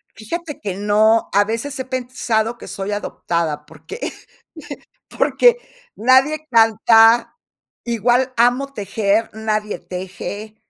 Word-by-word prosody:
Fíjate 300 +8 -6
que 195 -3 -4
no, 215 +2 +3
a 205 +1 +5
veces 230 +6 -4
he 260 - -3
pensado 240 -3 -2
que - - -11
soy 195 +1 -5
adoptada, 165 -6 -3
porque 435 - -11 1.2
porque 485 -1 +4 0.4
nadie 270 +6 +3
canta, 225 0 +4 0.5
igual 240 +3 +1
amo 250 +4 +2
tejer, 210 0 0
nadie 215 -1 -2
teje, 195 +4 -7
225 Hz, 105 wpm, -19 LUFS, 210-255 Hz, 1.2 s, a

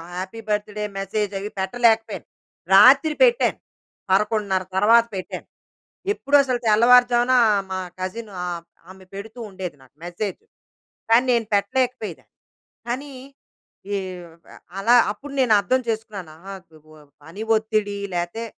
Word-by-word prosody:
Happy 185 +5 -6
birthday 210 0 -2
message 205 +1 -2
అవి 205 +2 -5
పెట్టలేకపోయాను. 225 +2 +1 0.5
రాత్రి 270 +9 +7
పెట్టాను. 485 -1 +3 0.5
11:30 205 -1 +1
తర్వాత 230 +4 +5
పెట్టాను. 185 - -7 0.7
ఎప్పుడూ 290 -7 +1
అసలు 255 -3 -1
తెల్లవారుజామున 245 +3 +5 0.4
మా 190 - -2 0.2
కజిన్ 205 +4 -5
ఆహ్, 175 -1 -4 0.3
ఆమె 190 0 -14
పెడుతూ 220 +4 -9
ఉండేది 185 -4 -7
నాకు 130 +1 -22
మెసేజ్. 195 - -5 0.7
కానీ 240 +3 +5
నేను 230 -2 +1
పెట్టలేకపోయేదాన్ని. 220 -3 -2 0.6
కానీ 270 +4 -4 0.8
ఈ - - +1 0.3
ఆహ్, 165 0 -18 0.4
అలా 230 +5 +4 0.2
అప్పుడు 280 +7 -12
నేను 250 -4 +3
అర్థం 255 +6 0
చేసుకున్నాను. 215 -8 -5 0.2
ఆహ్, 195 - -8 0.3
గుగ 155 0 -17 0.3
పని 185 +7 -9
ఒత్తిడి 215 -2 -1 0.2
లేతే 175 +7 -3
215 Hz, 120 wpm, -22 LUFS, 190-240 Hz, 0.8 s, రాత్రి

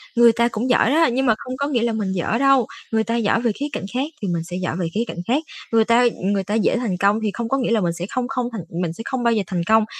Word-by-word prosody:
người 235 0 +7
ta 235 +1 +2
cũng 230 +4 -2
giỏi 245 -1 +4
đó, 325 +2 +4
nhưng 265 +3 0
mà 225 -3 +4
không 255 0 -7
có 280 - -1
nghĩa 255 -5 0
là 235 -1 0
mình 210 -3 -2
dở 190 +4 -1
đâu, 275 -2 +4 0.3
người 220 -1 +2
ta 230 - -2
giỏi 225 0 +1
về 235 -2 +1
khía 275 +7 -4
cạnh - - -4
khác 260 +3 0 0.2
thì 200 - -2
mình 170 -2 -1
sẽ 175 +2 -6
giỏi 170 - -2
về 180 - -1
khía 215 - 0
cạnh - - -7
khác. 275 +6 +1 0.3
Người 225 -1 +4
ta, 235 +2 +4
ừm, 205 -4 0
người 195 -1 0
ta 205 +3 -4
dễ 225 +2 +2
thành 225 -7 -2
công 200 +3 +2
thì 210 - 0
không 230 +1 -4
có 270 - +1
nghĩa 245 -3 -1
là 220 -3 +3
mình 170 -1 0
sẽ 170 +1 -5
không 250 0 -2
không 255 -2 -2
thành 225 -4 -5 0.2
mình 165 -2 -2
sẽ 200 - -8
không 260 -2 -2
bao 235 -1 +3
giờ 215 -3 +1
thành 180 -2 -2
công. 220 0 +4
230 Hz, 325 wpm, -21 LUFS, 200-245 Hz, 0.3 s, người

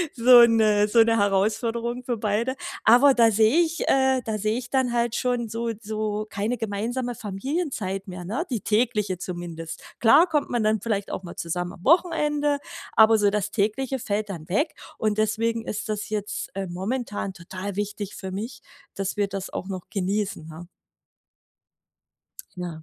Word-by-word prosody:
so 245 0 +8
'ne 215 -3 +4
so 230 +2 +5
'ne 230 0 +2
Herausforderung 225 +5 0
für 240 -2 -2
beide. 220 +5 -1 0.3
Aber 255 +5 +7
da 230 -2 +5
sehe 220 +8 +4
ich 335 0 0
äh, 265 -1 +3
da 220 -1 -2
sehe 215 +3 0
ich 245 -1 -6
dann 260 -3 +1
halt 235 -1 +1
schon 245 -2 0
so 230 +1 -3
so 215 0 -3
keine 215 +4 -2
gemeinsame 235 +4 -3
Familienzeit 210 - -3
mehr, 180 -1 -7
ne? 235 - -2
Die 235 -5 -2
tägliche 210 -4 0
zumindest. 170 -3 -6 0.2
Klar 280 +9 +6
kommt 300 -3 0
man 240 -3 0
dann 215 -1 +1
vielleicht 205 -3 -2
auch - - -4
mal 175 - -9
zusammen 175 +1 -3
am 175 - -15
Wochenende, 295 -3 +2 0.4
aber 220 0 +6
so 205 -1 +4
das 210 0 -2
Tägliche 240 +5 -1
fällt 210 -1 -2
dann 165 -3 -7
weg. 290 - +1 0.2
Und 215 -1 0
deswegen 225 +1 0
ist 210 +1 -4
das 210 0 -3
jetzt, 210 -1 -3
äh, 195 -1 -2
momentan 200 +2 -3
total 185 +2 -7
wichtig 205 0 -4
für 190 -1 -6
mich, 220 +5 -6 0.3
dass 195 +1 -3
wir 205 -1 +1
das 195 -1 -5
auch 190 - -5
noch 185 -2 -6
genießen, 200 -3 -2
ne? 160 +2 -10 1.9
Ja. 170 -3 -6
215 Hz, 170 wpm, -25 LUFS, 195-240 Hz, 1.9 s, so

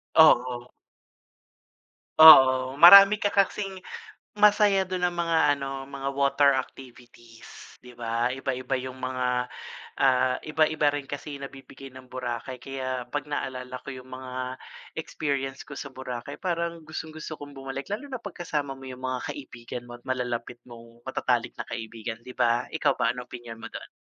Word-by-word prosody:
Oo. 125 -6 +5 1.5
Oo, 130 -4 +9
marami 200 +5 +10
ka 205 0 -1
kasing 195 -1 0 0.6
Masaya 205 -2 +4
dun 185 0 -4
ang 175 - -5
mga 165 -4 +2
ano, 135 -1 -6
mga 140 0 -4
water 140 +1 +3
activities, 120 -3 -13
di 125 -1 -15
ba? 115 0 -1
Iba-iba 135 0 -3
yung 130 0 -8
mga, 125 -1 -1 0.5
ah, 130 -1 +3
iba-iba 155 -1 +1
rin 145 - -4
kasi 145 +1 -7
nabibigay 135 -1 -11
ng 130 0 -13
Boracay 125 0 -5
kaya 130 -1 -5
'pag 145 0 -3
naalala 130 -3 -4
ko 140 - -7
yung 130 0 -10
mga 130 0 -6 0.4
experience 135 -3 -4
ko 140 - -9
sa 140 -1 -7
Boracay 125 -2 -7
parang 170 -2 -2
gustong-gusto 155 0 -7
kong 145 -1 -11
bumalik 135 +5 -6
lalo 250 +8 -4
na 260 -4 -7
'pag 205 -3 -9
kasama 145 -2 -2
mo 135 0 -9
yung 130 0 -9
mga 130 -1 -3
kaibigan 120 -3 -8
mo 120 0 -11
at - - -22
malalapit 120 -2 -3
mong 115 -1 -15
matatalik - - -1
na - - -5
kaibigan, 115 0 -6
di 125 - -9
ba? 120 -1 0
Ikaw - - +1
ba, 115 - +1
anong 125 0 -8
opinyon 120 -2 -9
mo 115 - -7
do'n? - - -9
130 Hz, 155 wpm, -26 LUFS, 125-150 Hz, 1.5 s, marami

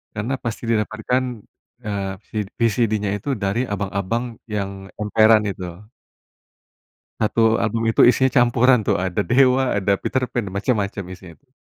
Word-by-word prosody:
Karena 110 +6 -2
pasti 115 0 -5
didapatkan, 110 +3 0 0.6
eee, 100 -2 -3 0.2
si 110 - -6 0.2
VCD-nya 110 -3 +1
itu 120 - -7
dari 100 +4 -1
abang-abang 100 +4 -3
yang 100 -2 -4
emperan 110 0 +4
itu. 95 +1 -6 1.3
1 115 +1 +2
album 115 +1 -1
itu - - -5
isinya 130 0 +2
campuran 125 0 +4
tuh, - - +3
ada 95 +1 -2
Dewa, 130 +3 +3
ada 100 0 +1
Peterpan, 125 -4 -2
macam-macam 100 -2 -1
isinya 90 -3 -11
tuh. - - -39
110 Hz, 130 wpm, -21 LUFS, 100-120 Hz, 1.3 s, emperan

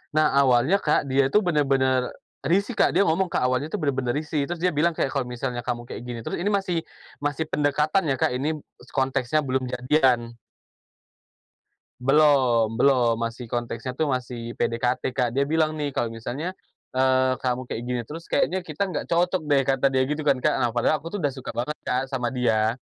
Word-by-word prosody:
Nah, 155 0 +5 0.2
awalnya 130 +7 +4
Kak, 150 -1 +2
dia 135 0 +2
itu 210 - +5
benar-benar 135 -7 +1 0.3
risih, 200 - +1
Kak. - - +3
Dia 195 +3 +3
ngomong, 170 +3 +1
Kak, 125 - +1
"Awalnya 130 +5 -1
tuh - - -2
benar-benar 135 -5 0
risih," 150 +1 -1
terus 175 +3 -4
dia 180 - +2
bilang 165 +4 +3
kayak, 160 - -1
"kalau 135 -1 -1
misalnya 125 0 -4
kamu 120 -1 -4
kayak - - -7
gini 120 -1 -6
terus" 115 - -4
ini 205 +3 0
masih 195 -3 0 0.5
masih 145 +2 -1
pendekatan 150 +5 +1
ya, 135 - +2
Kak, - - +2
ini 150 +4 -1 0.2
s - - -18
konteksnya 130 +2 +1
belum 130 -3 -1
jadian. 125 -3 +2 1.7
Belom, 130 -5 +4
belom. 125 -4 +4
Masih 115 +2 -4
konteksnya 120 +1 -4
tuh 150 +2 -1
masih 120 -2 -4
PDKT, 125 +2 0
Kak. 125 -2 +1
Dia 140 - +3
bilang 155 +1 +1
nih, 145 -2 -3
"Kalau 115 - -1
misalnya, 125 +9 -5 0.5
eee, 130 0 +3
kamu 125 0 -1
kaya - - -3
gini 125 -1 -2
terus 165 +2 -7
kayaknya 185 0 0
kita 165 +6 -2
nggak - - -3
cocok 175 0 +1
deh." 145 -2 +3
Kata 135 0 0
dia 130 - +3
gitu 150 0 -2
kan, 135 -3 +2
Kak. - - +3
Nah, 120 - +1
padahal 120 +6 +2
aku 165 +5 -9
tuh 205 - -3
dah 145 - +2
suka 130 -1 -7
banget, 125 +6 -3
Kak, 130 +1 -1
sama 125 -2 -2
dia. 110 -3 +2
135 Hz, 195 wpm, -24 LUFS, 125-155 Hz, 1.7 s, Nah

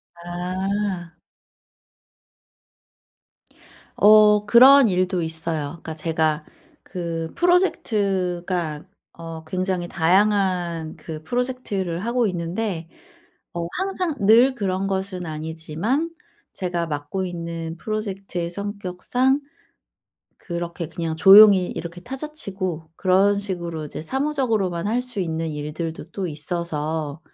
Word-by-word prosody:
아. 180 +1 -3 2.8
어 210 0 +6
그런 255 +4 +8
일도 185 -1 +1
있어요. 160 -1 -3
그러니까 160 - -6
제가 155 -1 0 0.4
그 165 -3 -4
프로젝트가 185 - 0 0.3
어 165 -1 -8
굉장히 185 +1 -2
다양한 180 -3 +1
그 155 -1 -8
프로젝트를 215 -7 -2
하고 235 -1 +1
있는데 175 0 -3 0.7
어 170 -1 -3
항상 370 -4 -1
늘 230 +6 +6
그런 195 -2 -1
것은 190 -2 -3
아니지만 160 - -2 0.4
제가 175 -2 -2
맡고 145 +5 -3
있는 170 -2 -5
프로젝트의 195 -4 -4
성격상 205 +8 -1 1.0
그렇게 170 -2 -5
그냥 165 0 -4
조용히 195 0 +8
이렇게 170 +1 -6
타자치고 200 - -5
그런 195 +2 +3
식으로 170 -6 -4
이제 150 - -7
사무적으로만 225 - -1
할 240 +3 +1
수 250 -5 -5
있는 165 -2 -2
일들도 155 +2 -5
또 195 -2 -3
있어서 155 -1 -3
180 Hz, 230 characters per minute, -23 LUFS, 165-205 Hz, 2.8 s, 그런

